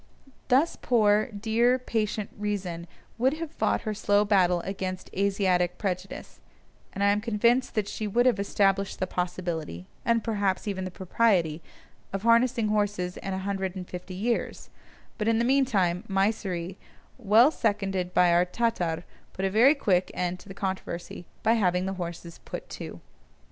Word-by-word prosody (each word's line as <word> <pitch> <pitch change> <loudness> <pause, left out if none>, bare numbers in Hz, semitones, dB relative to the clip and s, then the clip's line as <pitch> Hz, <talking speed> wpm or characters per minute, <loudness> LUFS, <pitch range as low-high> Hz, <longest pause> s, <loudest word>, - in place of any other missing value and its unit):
Thus 270 +6 +2
poor, 215 -3 +3
dear, 230 +3 +1
patient 215 -4 -2
Reason 190 -5 -3 0.3
would 260 +3 +3
have 325 -1 -6
fought - - 0
her 215 -2 -3
slow 205 0 +2
battle 180 -4 +3
against 185 -1 -5
Asiatic 185 -3 +1
prejudice, 190 -1 -5 0.5
and 200 - -3
I 200 - +5
am 205 +1 +1
convinced 235 +3 +1
that 210 -2 0
she 215 +1 -4
would 240 +4 +2
have 250 -5 +3
established 195 -1 +1
the - - -1
possibility 175 - -4 0.2
(and 230 -1 +2
perhaps 205 -3 -1
even 190 -2 -2
the - - -4
propriety) 180 -4 +1 0.5
of 195 +1 -4
harnessing 230 -1 +3
horses 205 -4 -1
in 195 - -4
a 190 0 -5
hundred 195 -2 -2
and 180 -1 -6
fifty 180 +1 -7
years; 230 +5 -2 0.5
but 210 - -1
in 225 0 +3
the 235 - +1
meantime 215 -9 +2
Mysseri, 195 -3 -1 0.4
well 230 +5 +5
seconded 195 - -1
by 180 -1 +4
our 175 +1 +5
Tatar, 180 -5 -1 0.3
put 190 - -2
a 190 - 0
very 245 +9 +6
quick 185 -9 +1
end 180 0 -2
to - - -15
the 195 - -9
controversy 190 -3 -5 0.2
by 225 - +4
having 180 -5 +1
the 190 - -2
horses 170 0 -7
put - - -7
to. - - -8
200 Hz, 160 wpm, -27 LUFS, 180-225 Hz, 0.5 s, very